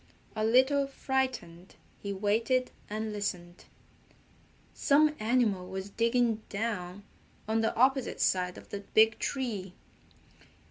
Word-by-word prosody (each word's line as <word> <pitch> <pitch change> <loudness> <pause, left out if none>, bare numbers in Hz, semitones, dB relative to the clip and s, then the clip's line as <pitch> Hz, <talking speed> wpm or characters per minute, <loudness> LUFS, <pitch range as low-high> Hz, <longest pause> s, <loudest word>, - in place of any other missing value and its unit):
A 215 - -1
little 260 +5 +4
frightened, 260 -11 -3 0.2
he 200 - -5
waited 225 +6 +1 0.2
and 215 +1 -3
listened. 180 -4 -5 1.1
Some 300 +2 +3
animal 215 -5 +1
was 190 +1 -6
digging 230 0 +1
down 200 -3 -3 0.4
on 220 +1 +1
the 225 - 0
opposite 265 +1 +2
side 180 -1 +1
of - - -13
the 200 - -5
big 220 +2 +3
tree. 210 -9 -3
220 Hz, 110 wpm, -30 LUFS, 195-255 Hz, 1.1 s, little